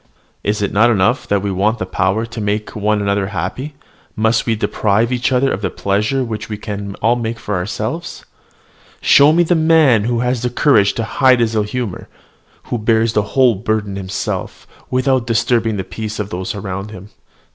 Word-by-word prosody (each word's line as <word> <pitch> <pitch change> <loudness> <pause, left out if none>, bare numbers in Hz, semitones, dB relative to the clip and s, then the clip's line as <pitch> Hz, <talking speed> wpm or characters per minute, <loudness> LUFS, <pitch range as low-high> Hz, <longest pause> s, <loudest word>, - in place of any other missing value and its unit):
Is 105 0 -1
it 100 - -2
not 110 +4 +4
enough 100 -5 +1
that 100 -1 0
we 100 - -1
want 105 +5 +1
the 95 - -3
power 95 +4 0
to 115 -1 -7
make 105 +1 -2
one 105 0 0
another 100 -1 0
happy, 100 - -4 0.4
must 110 +2 +1
we 115 - +2
deprive 110 +2 0
each 125 +2 0
other 130 +1 +2
of 100 - -3
the - - -1
pleasure 105 +7 0
which 110 -2 -5
we 105 - -4
can 100 -1 -6
all 115 +2 +4
make 115 -1 -3
for 105 - -5
ourselves? 110 - -4 0.7
Show 140 +2 +6
me 170 +2 +4
the 175 - +1
man 160 -9 +4
who 120 0 0
has 125 -1 0
the 125 - -1
courage 120 -5 +3
to 115 - -3
hide 125 +4 +3
his 115 -1 +1
ill 110 - +2
humour, 105 -2 -4 0.6
who 120 - -3
bears 110 +1 +2
the 105 - +3 0.2
whole 130 -3 +5
burden 105 -1 -2
himself, 95 -1 -4 0.2
without 130 -1 +1
disturbing 115 -1 +1
the 95 - -2
peace 110 +3 -6
of 105 -1 -4
those 90 +4 -4
around 95 0 -5
him. 100 -1 -11
110 Hz, 190 wpm, -17 LUFS, 100-120 Hz, 0.7 s, Show